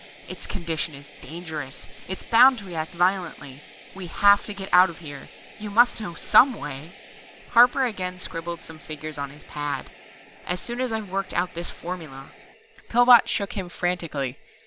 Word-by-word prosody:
Its - - -8
condition 165 -5 -3
is 140 0 -13
dangerous 155 -5 -7 0.2
it's 190 - -6
bound 255 +3 +6
to 205 - -9
react 165 -2 -5
violently. 175 -6 -1 0.3
We 190 -2 -7
have 200 +3 +5
to 210 - -4
get 195 -1 -8
out 180 +1 +7
of 170 - -10
here. 145 -4 -10 0.3
You 210 0 -6
must 235 +2 +4
know 175 -6 -6
some 260 +8 +5
way 145 +3 -8 0.3
" - - -21
Harper 245 +2 +6
again 185 -6 -4
scribbled 170 -1 -6
some 160 -1 -11
figures 155 0 -7
on 140 -1 -3
his 145 +2 -13
pad. 145 -1 -5 0.6
"As 180 0 -1
soon 240 +4 -5
as 255 -2 -1
I've 220 -4 -3
worked 195 0 -3
out 180 +1 0
this 170 +1 -4
formula 160 -6 -8 0.3
" - - -27
Pillbot 245 0 +7
shook 200 -1 -1
him 190 -4 -5
frantically. 165 -8 -3
175 Hz, 175 wpm, -24 LUFS, 155-200 Hz, 0.6 s, out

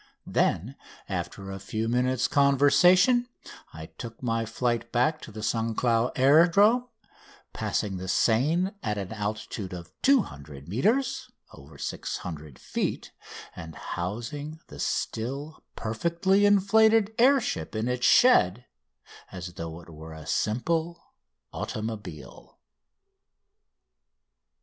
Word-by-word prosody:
Then 120 +11 0 0.3
after 95 0 -5
a 95 - -6
few 110 +4 -3
minutes' 125 +1 +1
conversation 175 - +4 0.4
I 80 0 -9
took 115 +8 -10
my 115 -1 -1
flight 120 -1 -2
back 155 +6 +1
to - - -10
the 110 0 -8
St 115 0 -1
Cloud 120 0 +1
Aerodrome, 180 - +5 0.7
passing 100 -3 -2
the 95 +1 -6
Seine 150 - +2
at 105 -2 -2
an 100 +1 -5
altitude 105 -2 -4
of 85 -2 -9
200 70 - 0
metres 255 - 0 0.2
(over 70 +3 -14
600 75 -6 -6
feet), - - -3 0.4
and 80 -1 -9
housing 120 - -5
the 70 - -11
still 135 - -3
perfectly 170 - +1
inflated 220 +2 +4
air 270 +3 +6
ship 240 - -4
in 110 +2 -1
its 125 0 +1
shed 125 - +5 0.7
as 90 -1 -7
though 85 -1 -7
it 85 - -16
were 80 +1 -10
a 80 -1 -10
simple 160 - -2 0.4
automobile. 105 - -7
120 Hz, 110 wpm, -27 LUFS, -, 0.7 s, air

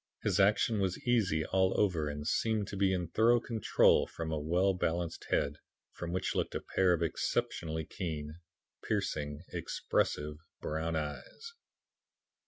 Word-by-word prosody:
His - - +1
action 105 +2 +3
was 95 -2 0
easy 100 -11 +2
all 95 0 +2
over 85 -7 +1
and 75 0 -5
seemed 110 -3 +1
to - - -5
be 95 -1 +2
in 90 -3 -1
thorough 115 +5 +4
control 115 -3 +3
from 80 -1 -5
a 80 - -1
well 90 +6 +2
balanced 85 -2 -2
head, 70 +1 +1 0.4
from 85 -1 -5
which 95 - -1
looked - - -1
a - - 0
pair 95 -1 +2
of 85 -1 0
exceptionally 80 0 -1
keen, 75 -3 -5 0.4
piercing, 75 +1 -2
expressive 75 0 -1 0.2
brown 80 +1 -2
eyes. 80 - -5
85 Hz, 145 wpm, -32 LUFS, 80-100 Hz, 0.4 s, thorough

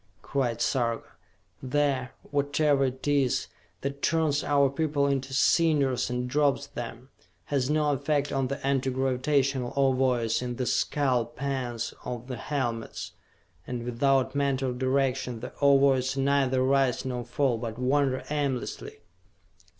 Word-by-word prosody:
cried 120 -4 -1
Sarka. 120 -1 0 0.5
"The 135 -1 0 0.2
whatever 145 0 +2
it 130 +2 -4
is 140 -3 +2 0.4
that 140 +1 -4
turns 155 -2 +1
our 140 -1 +3
people 145 +1 0
into 135 -1 -1
cinders 140 -3 +2
and 125 0 -2
drops 140 +1 +1
them, 120 -2 -8 0.4
has 135 -1 +1
no 150 -1 +2
effect 145 +1 0
on 135 -1 0
the 140 +1 -5
Anti 135 -1 +1
Gravitational 130 0 0
Ovoids 125 -4 +2
in 125 -1 -3
the 125 - -2
skull 130 -3 +1
pans 125 -3 -3
of 125 -1 -5
the 125 -1 -6
helmets, 120 -5 -3 0.6
and 120 -1 -4
without 130 +2 +1
mental 135 -2 0
direction, 130 -1 0
the 120 - -7
Ovoids 135 -2 +4
neither 135 -1 +2
rise 135 -1 +2
nor 125 -2 -3
fall 125 -1 0
but 115 -1 -5
wander 130 +1 +1
aimlessly! 140 -10 -3
135 Hz, 130 wpm, -27 LUFS, 125-140 Hz, 0.6 s, Ovoids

